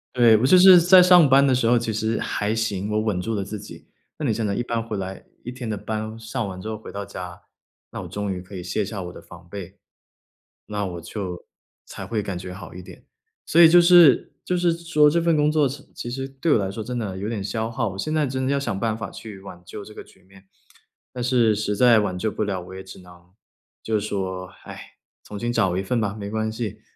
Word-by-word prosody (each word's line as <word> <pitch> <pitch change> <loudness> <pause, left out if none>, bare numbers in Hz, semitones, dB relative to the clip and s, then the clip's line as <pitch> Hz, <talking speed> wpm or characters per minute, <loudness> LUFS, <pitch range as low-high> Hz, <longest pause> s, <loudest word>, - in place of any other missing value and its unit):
对， 120 -3 +6
我 115 - +1
就 165 +7 +6
是 180 -1 +9
在 180 +2 +7
上 180 -4 +6
班 135 +1 +6
的 135 - +3
时 125 -2 +1
候 120 +1 +4
其 115 -1 -2
实 110 +1 -1
还 105 +1 -2
行， 105 -3 -2
我 105 - +1
稳 105 -5 -1
住 115 +4 -3
了 100 - -2
自 105 +2 -7
己。 105 - -12 0.3
那 155 - -4
你 115 - +1
想 110 +1 -2
着 100 - -1
一 120 - -1
班 115 -1 -2
回 110 -2 -5
来 95 0 -6 0.2
一 125 - -6
天 125 -2 -7
的 105 - -2
班 110 +1 -5
上 115 0 -4
完 95 -1 -7
之 95 - -8
后 110 - -4
回 110 - -11
到 100 0 -5
家， 90 -2 -8 0.5
那 - - -6
我 - - -8
终 105 -1 -4
于 90 - -6
可 95 +2 -12
以 90 - -6
卸 90 +4 -2
下 100 0 -5
我 90 0 -8
的 - - -11
防 90 0 -15
备， 95 -1 -9 0.9
那 105 -1 -3
我 85 -2 -6
就 90 0 -6 0.4
才 - - -8
会 110 -3 -2
感 95 -3 -4
觉 90 0 -7
好 95 - -10
一 90 - -9
点。 90 - -14 0.4
所 170 - +4
以 165 - +9
就 175 +2 +7
是 170 -5 +6
就 180 - -1
是 175 -1 +2
说 165 -3 +3
这 170 +3 +1
份 165 -1 +2
工 150 0 +3
作 150 -3 +2
其 140 +1 -8
其 120 - -6
实 135 +1 -4
对 135 +4 -2
我 - - +4
来 95 -2 -2
说 110 +2 -6
真 125 +3 -5
的 105 -5 -4
有 100 +3 -4
点 110 -4 -3
消 110 +3 -3
耗， 115 - -2
我 95 - -8
现 155 +11 -3
在 155 -1 +2
真 130 -1 -3
的 - - +1
要 140 - +1
想 100 -8 -3
办 110 0 -1
法 110 - -6
去 105 -4 -10
挽 90 -2 -11
救 100 +3 -9
这 105 - -12
个 - - -9
局 - - -23
面， 95 +1 -20 0.7
但 125 -1 -4
是 120 -3 +3
实 105 0 -2
在 115 +1 +5
挽 95 -3 -2
救 110 +4 -1
不 - - -2
了 95 -3 -3
我 95 +1 -11
也 95 - -8
只 95 - -12
能 90 -1 -17 0.5
就 110 -1 0
是 105 - -5
说： 95 -2 -4 0.2
“唉， - - -11 0.3
重 105 - -8
新 120 +2 -2
找 90 -5 +1
一 95 - -1
份 115 +4 -1
吧！ 105 -1 -2
没 100 0 -5
关 110 0 -2
系！” 110 -2 -5
110 Hz, 280 characters per minute, -23 LUFS, 95-125 Hz, 0.9 s, 是